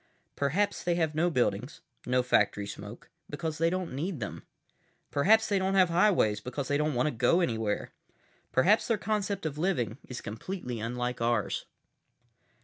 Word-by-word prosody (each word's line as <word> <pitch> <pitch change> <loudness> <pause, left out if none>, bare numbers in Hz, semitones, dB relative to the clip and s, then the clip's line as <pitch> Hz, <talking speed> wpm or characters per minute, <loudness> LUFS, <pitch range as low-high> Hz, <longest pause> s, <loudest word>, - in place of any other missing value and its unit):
"Perhaps 190 +9 0
they 175 -1 +1
have 160 -3 0
no 165 +3 +2
buildings, 125 -7 -1 0.3
no 125 0 +2
factory 105 -4 +2
smoke, 105 +9 -9 0.2
because 150 +2 -4
they 165 0 +3
don't 185 -4 -3
need 160 +4 -3
them. 105 - -5 0.7
Perhaps 215 +10 +4
they 200 -2 +2
don't 190 +1 0
have 185 -2 +5
highways 170 - +3
because 130 +4 -4
they 145 - +2
don't 150 -2 0
want 125 - +2
to 150 - +1
go 125 +9 +3
anywhere. 110 - -1 0.6
Perhaps 195 +12 +4
their 230 - +2
concept 205 -3 -2
of 150 -1 -3
living 140 - 0
is 125 - -6
completely 125 - -5
unlike 125 +2 -3
ours." 115 -2 0
150 Hz, 160 wpm, -29 LUFS, 120-185 Hz, 0.7 s, have